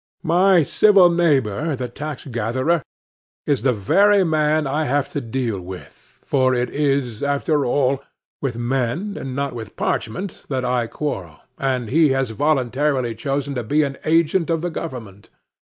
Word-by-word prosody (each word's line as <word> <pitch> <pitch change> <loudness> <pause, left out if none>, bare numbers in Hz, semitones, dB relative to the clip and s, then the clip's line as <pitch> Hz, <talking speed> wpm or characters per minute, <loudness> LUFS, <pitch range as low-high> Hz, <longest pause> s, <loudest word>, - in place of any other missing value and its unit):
My 180 +1 +4
civil 195 +2 +5
neighbor, 150 -4 +1
the 125 -1 -4
tax 145 +3 -7
gatherer, 130 +6 0 0.6
is 140 -5 +1
the 130 +2 +3
very 195 - +3
man 155 -2 +1
I 150 +3 -1
have 145 +1 0
to 145 - -3
deal 115 -3 -2
with,—for 130 +8 -3
it 125 0 -1
is, 135 -6 0
after 140 0 0
all, 135 +1 +1 0.4
with 125 -5 -2
men 130 - -1
and 130 -1 -5
not 140 -1 -2
with 110 -3 -8
parchment 180 - -3
that 130 -2 -1
I 125 -2 0
quarrel,—and 125 - -4
he 155 +1 +4
has 135 -3 0
voluntarily 130 -1 0
chosen 140 +4 -3
to 125 -3 -3
be 150 +7 +2
an 140 -1 -3
agent 165 +2 +2
of 165 -1 0
the 175 - -2
government. 115 - -7
135 Hz, 150 wpm, -21 LUFS, 120-155 Hz, 0.6 s, civil